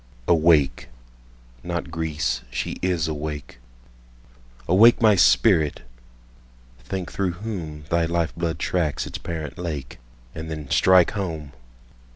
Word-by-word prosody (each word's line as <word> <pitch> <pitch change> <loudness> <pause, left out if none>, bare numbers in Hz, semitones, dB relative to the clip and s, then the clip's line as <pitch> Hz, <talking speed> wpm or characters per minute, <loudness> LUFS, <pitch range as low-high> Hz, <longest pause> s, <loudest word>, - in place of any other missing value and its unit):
Awake! 80 -7 +3 0.7
(not 85 -1 -4
Greece—she 75 -7 -3
is 90 -4 0
awake!)Awake, - - -1
my 110 -2 +5
spirit! 70 +1 +3 1.0
Think 95 -2 -5
through 95 -3 -1
whomThy 85 -5 -3
life 85 -1 -1
blood 85 -2 -2
tracks 80 -1 -1
its - - -7
parent 80 -2 -6
lake, 75 -7 -5 0.3
And 80 0 -7
then 75 -3 -7
strike 95 -2 +5
home! 80 -8 -4
80 Hz, 100 wpm, -23 LUFS, 70-85 Hz, 1.0 s, my